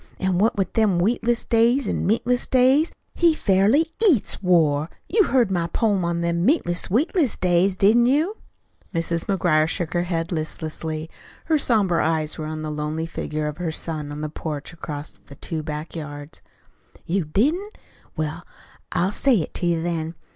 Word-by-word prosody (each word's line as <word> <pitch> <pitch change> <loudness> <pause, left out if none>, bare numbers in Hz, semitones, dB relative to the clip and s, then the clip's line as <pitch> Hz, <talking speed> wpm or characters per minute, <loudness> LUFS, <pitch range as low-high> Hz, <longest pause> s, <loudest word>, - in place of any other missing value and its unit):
An' 190 -2 0
what 215 +1 +2
with 195 - -1
them 215 -5 +2
wheatless 235 +5 +1
days 235 +2 +3
an' - - -1
meatless 240 +4 +1
days, 265 +5 +4 0.2
he 335 -2 +3
fairly 225 - +2 0.2
EATS 265 - +1
war. 160 -5 +2 0.2
You 415 +1 +3
heard 245 -9 +2
my 170 -3 0
poem 200 0 +1
on 170 0 -1
them 170 0 0
meatless, 180 - +1
wheatless 280 - +1
days, 180 +1 +2
didn't 225 +5 +4
you?" 315 - +1 0.6
Mrs. 165 0 -1
McGuire 170 -5 +2
shook 170 -1 -2
her 175 0 0
head 165 -1 -2
listlessly. 155 -1 -4 0.4
Her 315 -2 +2
somber 205 -10 +2
eyes 155 -1 -1
were 155 - -4
on 155 0 -5
the 155 - -3
lonely 150 +2 -3
figure 155 -2 -4
of 150 +2 -4
her 170 -2 -2
son 155 -2 -4
on 150 +1 -6
the 155 - -3
porch 150 0 -6
across 150 -3 -7
the 140 - -12
two 160 +1 -4
back 150 +1 -6
yards. 145 -1 -8 0.6
"You 190 +2 0
didn't? 305 - 0 0.4
Well, 155 +2 -3 0.5
I'll 180 +2 +1
say 265 +4 +2
it 175 - -2
to 175 - -1
you, 165 -1 0
then. 165 -1 -3
175 Hz, 170 wpm, -23 LUFS, 160-230 Hz, 0.6 s, days